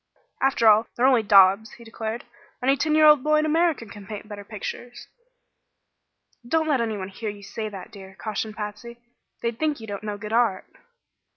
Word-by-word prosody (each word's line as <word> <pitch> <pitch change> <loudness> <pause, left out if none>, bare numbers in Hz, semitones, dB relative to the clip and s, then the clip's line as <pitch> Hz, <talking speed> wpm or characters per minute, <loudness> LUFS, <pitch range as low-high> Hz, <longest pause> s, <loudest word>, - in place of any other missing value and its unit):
"After 265 -4 +3
all, 215 +1 +6
they're 245 - +2
only 260 -3 +5
daubs," 200 +1 +5
he 235 - -13
declared. 225 0 -6 0.4
"Any 270 +2 +4
ten 305 +2 0
year 310 0 +6
old 300 -3 +7
boy 305 0 +3
in 305 - +2
America 320 -4 +1
can 205 -2 -12
paint 210 -1 -7
better 205 -1 -8
pictures." 225 +4 -7 1.4
"Don't 315 +6 0
let 280 -5 +2
anyone 210 -5 -3
hear 215 +3 -5
you 205 -1 -9
say 215 +2 -5
that, 195 0 -10
dear," 190 -2 -12
cautioned 215 0 -4
Patsy. 215 +3 -7 0.5
"They'd 235 0 -2
think 305 -3 0
you 225 - -9
don't 205 -2 -6
know 210 -1 -5
good 210 +1 -7
art." 230 -5 +2
225 Hz, 185 wpm, -24 LUFS, 205-255 Hz, 1.4 s, old